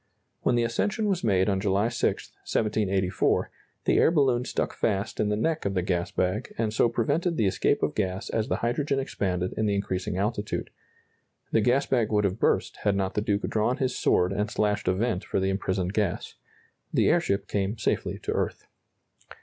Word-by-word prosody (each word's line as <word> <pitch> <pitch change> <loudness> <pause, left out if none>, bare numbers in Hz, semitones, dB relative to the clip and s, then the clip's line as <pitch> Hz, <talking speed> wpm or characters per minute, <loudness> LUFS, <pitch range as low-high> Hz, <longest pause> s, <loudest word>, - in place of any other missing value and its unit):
When - - +2
the 120 - +2
ascension 205 - 0
was 190 -3 0
made 95 -4 +3
on 95 -2 +1
July 100 +2 +2
6, 120 - -1
1784, 100 -4 0 0.3
the - - +3
air - - +5
balloon 135 -7 +2
stuck - - -2
fast 105 0 -1
in 105 - +2
the 105 - +1
neck 160 +9 0
of 100 0 -1
the 90 - +1
gas 85 -1 -1
bag, 95 +3 -2
and 110 -2 0
so 115 - +3
prevented 150 +9 0
the 110 - +2
escape 95 - +1
of - - +1
gas 95 -2 -2
as 110 -1 0
the - - 0
hydrogen 140 +4 0
expanded 90 -9 -2
in 110 - 0
the 100 - +1
increasing 95 -2 -2
altitude. 105 +1 -2 0.8
The 110 - +3
gas 125 +5 +3
bag 115 -5 +1
would 105 -1 +2
have 100 +2 -1
burst - - +1
had 100 -1 +1
not 95 -1 -1
the 105 - 0
Duke 105 -1 0
drawn 110 +4 +1
his 130 -3 -1
sword 90 +2 +2
and 105 +2 -1
slashed 105 -1 0
a 95 - +4
vent 110 -2 -1
for - - -1
the 95 0 +1
imprisoned 95 -1 -1
gas. 105 -5 -1 0.6
The - - +3
airship 100 +1 +1
came 100 +2 -1
safely 110 - -1
to - - -2
earth. - - -2
105 Hz, 195 wpm, -27 LUFS, 95-120 Hz, 0.8 s, air